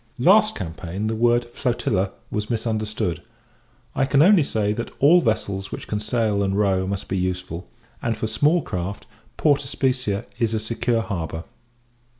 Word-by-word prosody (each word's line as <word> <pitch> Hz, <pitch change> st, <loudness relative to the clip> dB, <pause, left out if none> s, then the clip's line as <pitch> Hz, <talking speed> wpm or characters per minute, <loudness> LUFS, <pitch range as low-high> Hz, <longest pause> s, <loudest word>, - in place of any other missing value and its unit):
Last 210 Hz, -, +5 dB
campaign, 85 Hz, +4 st, -5 dB
the 110 Hz, +1 st, 0 dB
word 120 Hz, +1 st, +3 dB
flotilla 120 Hz, -6 st, -1 dB, 0.2 s
was 105 Hz, 0 st, -2 dB
misunderstood. 110 Hz, -5 st, -2 dB, 0.7 s
I 135 Hz, -, +2 dB
can 145 Hz, +1 st, +5 dB
only 195 Hz, 0 st, +6 dB
say, 105 Hz, -6 st, 0 dB
that 115 Hz, +2 st, -4 dB
all 165 Hz, +6 st, +6 dB
vessels 100 Hz, -, -1 dB
which -, -, -6 dB
can 105 Hz, -, -2 dB
sail 105 Hz, -2 st, 0 dB
and 100 Hz, 0 st, 0 dB
row 95 Hz, -2 st, +2 dB
must 100 Hz, 0 st, -3 dB
be 95 Hz, -, -1 dB
useful; 90 Hz, -1 st, -3 dB, 0.3 s
and, 115 Hz, -2 st, -1 dB
for 110 Hz, -, -2 dB
small 145 Hz, +9 st, +2 dB
craft, 95 Hz, +1 st, -4 dB, 0.3 s
Port 145 Hz, -2 st, +3 dB
Especia 125 Hz, -6 st, -1 dB
is 115 Hz, -2 st, +1 dB
a -, -, 0 dB
secure 115 Hz, +1 st, 0 dB
harbour. 80 Hz, -5 st, -4 dB
110 Hz, 155 wpm, -23 LUFS, 95-120 Hz, 0.7 s, only